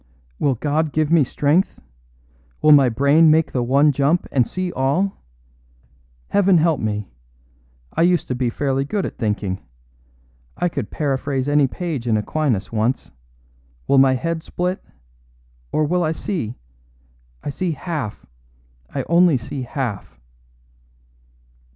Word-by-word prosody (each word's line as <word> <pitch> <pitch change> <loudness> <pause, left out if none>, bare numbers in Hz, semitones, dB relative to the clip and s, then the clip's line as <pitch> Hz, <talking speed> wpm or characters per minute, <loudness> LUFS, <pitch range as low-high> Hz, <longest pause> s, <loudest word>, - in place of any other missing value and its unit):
Will 135 -3 +2
God 150 +4 -1
give 155 0 +1
me 165 -3 +5
strength? 145 +7 +1 0.8
Will 155 - +5
my 140 -4 +7
brain 140 +7 +4
make 160 +1 +3
the 125 - -1
one 140 +5 +4
jump 145 +5 +1
and 125 -4 +2
see 185 -1 -3
all? 170 +10 0 1.1
Heaven 195 -2 +4
help 160 -2 +2
me! 105 -4 -3 0.8
I - - 0
used 175 0 +2
to - - 0
be 125 -1 -1
fairly 135 +2 -1
good 195 +8 -2
at - - -7
thinking. 105 -4 -2 1.0
I 175 - +1
could - - -4
paraphrase 135 -2 -2
any 145 -1 +3
page 150 -5 -4
in 110 -2 +2
Aquinas 120 -1 -1
once. 115 +3 -1 0.8
Will 140 - +5
my 135 -1 +5
head 165 +5 -2
split 180 +3 -3 0.9
or 155 - +1
will 175 +3 +1
it 155 +1 -1
see? 150 - -3 0.9
I - - -3
see 175 +3 -2
half 150 - -5 0.7
I - - -2
only 170 -2 +4
see 130 +3 -6
half." 125 -5 -5
145 Hz, 135 wpm, -21 LUFS, 130-165 Hz, 1.1 s, my